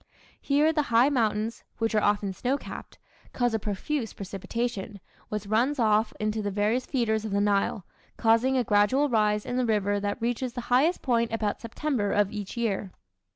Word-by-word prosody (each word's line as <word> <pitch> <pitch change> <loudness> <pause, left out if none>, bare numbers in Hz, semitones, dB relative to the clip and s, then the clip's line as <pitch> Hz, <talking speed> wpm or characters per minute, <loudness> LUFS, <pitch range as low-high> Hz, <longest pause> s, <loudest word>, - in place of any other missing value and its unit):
Here 295 +3 +3
the 305 - +2
high 235 +4 +5
mountains, 225 -3 0
which 225 0 -1
are 215 - +3
often 205 -1 +1
snow 255 +7 -1
capped, - - -9 0.4
cause 245 -2 +1
a 220 - +1
profuse 225 +5 -3
precipitation, 200 +1 -4 0.3
which 210 -1 -3
runs 235 +8 +1
off 215 -2 +2
into 215 0 -1
the 205 - -2
various 210 +5 0
feeders 220 -5 0
of 220 - -4
the 200 0 0
Nile, 200 -2 +1 0.3
causing 235 +4 +3
a 250 - +2
gradual 210 +8 +3
rise 210 -3 +2
in 245 - -3
the 255 - +1
river 205 -2 +1
that 205 0 -2
reaches 240 +1 -2
the 245 - -4
highest 305 +8 +3
point 235 -3 +1
about 215 -2 -2
September 230 -2 -2
of 205 -1 +2
each 210 +2 -6
year. 210 -4 -1
220 Hz, 180 wpm, -27 LUFS, 205-245 Hz, 0.4 s, high